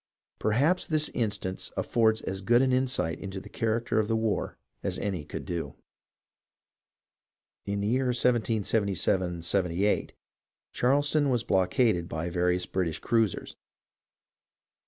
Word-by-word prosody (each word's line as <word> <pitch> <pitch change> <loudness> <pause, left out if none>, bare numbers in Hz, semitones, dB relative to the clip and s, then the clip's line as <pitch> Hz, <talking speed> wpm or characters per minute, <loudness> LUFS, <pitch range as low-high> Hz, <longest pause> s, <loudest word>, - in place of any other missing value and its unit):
Perhaps 145 +12 +2
this 155 -1 +1
instance 100 -4 -2
affords 110 -2 +2
as 95 0 -4
good 120 +6 +4
an 130 -1 +2
insight 130 -10 0
into 95 -1 -6
the - - -12
character 115 0 0
of 105 - +1
the 115 - +1
war 110 -2 -1 0.2
as - - -2
any 95 -6 -3
could - - -7
do. 85 -2 -4 1.9
In 100 0 -1
the 100 - -1
year 130 +4 +1
1777 105 -7 +1
78 95 +2 +1 0.6
Charleston 145 +3 +2
was 120 -3 +1
blockaded 95 -1 +2
by 80 +2 -3
vari 90 +1 +2
ous 90 0 -2
British 90 -4 -1
cruisers. 115 -5 0
105 Hz, 125 wpm, -28 LUFS, 95-120 Hz, 1.9 s, good